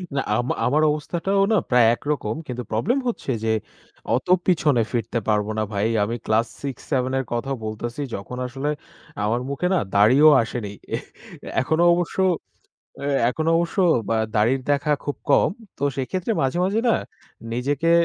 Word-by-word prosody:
না 135 - +2 0.2
আমা 120 +1 0
আমার 150 +5 +3
অবস্থাটাও 175 +6 -1
না 215 - +4
প্রায় 125 -2 +5
একরকম। 140 -7 -2
কিন্তু 125 -1 -4
প্রবলেম 120 - +1
হচ্ছে 220 - -2
যে 110 0 +2 0.6
অত 130 - -3 0.2
পিছনে 150 -9 +3
ফিরতে 115 -1 -1
পারবো 105 -1 +1
না - - +1
ভাই। 100 +2 +1 0.2
আমি 115 +3 -2
ক্লাস 110 +2 +2
৬-৭ 135 -1 -2
এর 135 - -3
কথাও 135 +3 -2
বলতেছি। 120 +5 -4
যখন 115 +6 -7
আসলে 135 +4 -3 0.5
আমার 115 +4 0
মুখে 140 +6 -1
না - - +3 0.2
দাড়িও 130 +10 +7
আসেনি। 110 -3 -5 0.2
এহ! - - -5 0.6
এখনও 160 +6 +1
অবশ্য 175 +1 -3 1.1
এখনো 160 +6 -1
এ - - +5
অবশ্য 170 +2 -2 0.6
দাড়ির 120 +5 +3
দেখা 145 +1 +2
খুব 145 - -3
কম। - - +5 0.3
তো 140 - -1
সেক্ষেত্রে 185 - -2
মাঝে, 135 +5 0
মাঝ 195 +2 0
না 230 - +4 0.6
নিজেকে 145 +7 0
130 Hz, 155 wpm, -23 LUFS, 115-155 Hz, 1.1 s, দাড়িও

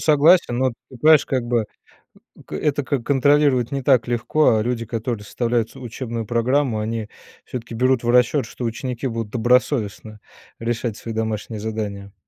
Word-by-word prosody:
согласен, 155 -3 +4
но 130 - +2
от 120 - -1 0.2
ты 130 - -11
понимаешь, 155 +2 +6
как 130 -3 -1
бы, 120 -3 0 0.7
м, - - -16
г - - -6
это 145 -2 0
как 135 -2 -2
контролировать 140 -2 +3
не 140 -1 -2
так 125 -3 +3
легко, 120 +2 +2
а 110 - +2
люди 115 -1 -2
которые 115 -1 -4
составляют 115 0 -1
ц - - -13
учебную 120 -2 -5
программу 120 +1 +1
они, 110 0 -3 0.4
всё-таки, 120 -2 -7
берут 130 +1 +2
в 120 - -1
расчет, 125 +2 +3
что 120 - -8
ученики 120 +2 -4
будут 115 -3 -4
добросовестно 115 -3 0 0.4
решать 115 -1 -2
свои 115 - -6
домашние 110 0 -3
задания. 105 -2 -5
120 Hz, 170 wpm, -21 LUFS, 110-130 Hz, 0.7 s, понимаешь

